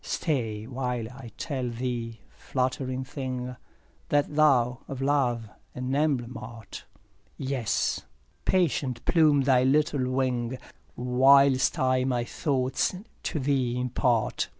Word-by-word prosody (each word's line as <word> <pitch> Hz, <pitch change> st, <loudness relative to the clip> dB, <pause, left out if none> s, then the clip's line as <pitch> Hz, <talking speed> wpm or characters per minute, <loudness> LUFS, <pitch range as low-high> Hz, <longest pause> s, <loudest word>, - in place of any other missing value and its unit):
2 -, -, -13 dB
Stay 115 Hz, -9 st, -1 dB
while 125 Hz, -2 st, -3 dB
I 125 Hz, -2 st, -10 dB
tell 130 Hz, -6 st, -3 dB
thee, 115 Hz, -2 st, -4 dB
fluttering 130 Hz, 0 st, -2 dB
thing, 130 Hz, -2 st, -5 dB, 0.5 s
That 145 Hz, 0 st, +1 dB
thou 125 Hz, -5 st, +4 dB
of 135 Hz, -, -6 dB
love 135 Hz, -5 st, +1 dB, 0.3 s
an 125 Hz, +1 st, -3 dB
emblem 135 Hz, -4 st, 0 dB
art; 115 Hz, -1 st, -9 dB, 0.5 s
Yes! 130 Hz, -5 st, -1 dB, 0.4 s
patient 140 Hz, -9 st, 0 dB
plume 155 Hz, -4 st, +4 dB
thy 130 Hz, -2 st, +4 dB
little 140 Hz, -1 st, +2 dB
wing, 130 Hz, -1 st, -1 dB, 0.4 s
Whilst 130 Hz, +2 st, +4 dB
I 130 Hz, 0 st, +2 dB
my 125 Hz, -2 st, 0 dB
thoughts 130 Hz, +4 st, 0 dB, 0.3 s
to 155 Hz, -, -2 dB
thee 130 Hz, -3 st, 0 dB
impart. 125 Hz, -2 st, 0 dB
130 Hz, 115 wpm, -27 LUFS, 125-140 Hz, 0.5 s, thou